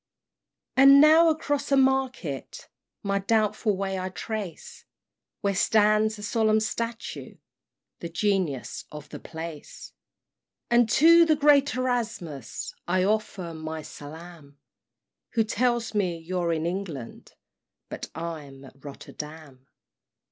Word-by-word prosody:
V. - - +6
And 275 +1 +9
now 315 +3 +7
across 290 -3 -1
a 275 - +5
market 260 - -1 0.4
My 200 0 0
doubtful 210 0 +1
way 195 -1 -2
I 185 0 -3
trace, 215 - -6 0.6
Where 200 -1 +1
stands 215 +2 +3
a 205 - -9
solemn 220 0 +2
statue, 230 +1 -4 0.6
The 170 - -6
Genius 180 - -1
of 150 -1 -10
the - - -8
place; 160 -2 -9 0.8
And 240 -1 +4
to 335 +7 +7
the 320 -2 +3
great 285 -2 +4
Erasmus 230 - -3
I 185 +1 +2
offer 195 -4 -1
my 160 0 -6
salaam; 155 -1 -11 0.8
Who 225 - +3
tells 235 +1 0
me 185 -5 0
you're 170 +1 -2
in 160 -1 -1
England, 170 -9 -6 0.5
But - - -7
I'm 150 -5 -7
at 135 +1 -17
Rotterdam. 145 -1 -10
200 Hz, 120 wpm, -26 LUFS, 160-235 Hz, 0.8 s, And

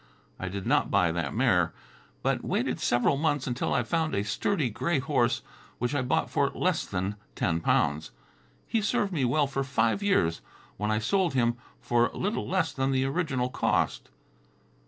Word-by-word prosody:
I 95 - -3
did 95 +1 -5
not 145 +5 +2
buy 90 -4 +3
that 80 -4 -2
mare, - - +3 0.5
but - - 0
waited - - -1
several 120 +3 +2
months 145 -2 0
until 125 -1 -2
I - - +2
found 160 -2 0
a 100 - 0
sturdy 140 - 0
gray 155 +9 0
horse, 135 -4 +1 0.3
which 120 +2 -1
I 145 - +1
bought 125 +1 0
for - - +2
less - - -1
than 95 +3 -2 0.2
ten 85 -4 0
pounds. 75 -1 +1 0.6
He 225 - +1
served 200 -1 0
me 145 -6 +1
well 145 +4 +2
for 135 0 -2
five 130 - +1
years, 85 - +2 0.4
when 105 +2 -1
I 110 - +2
sold 170 - +1
him 120 -2 +2 0.2
for 120 0 +2
little 205 +4 -2
less 180 -6 0
than 135 0 0
the 130 0 +1
original 135 -4 -1
cost. - - 0
130 Hz, 175 wpm, -28 LUFS, 105-155 Hz, 0.6 s, buy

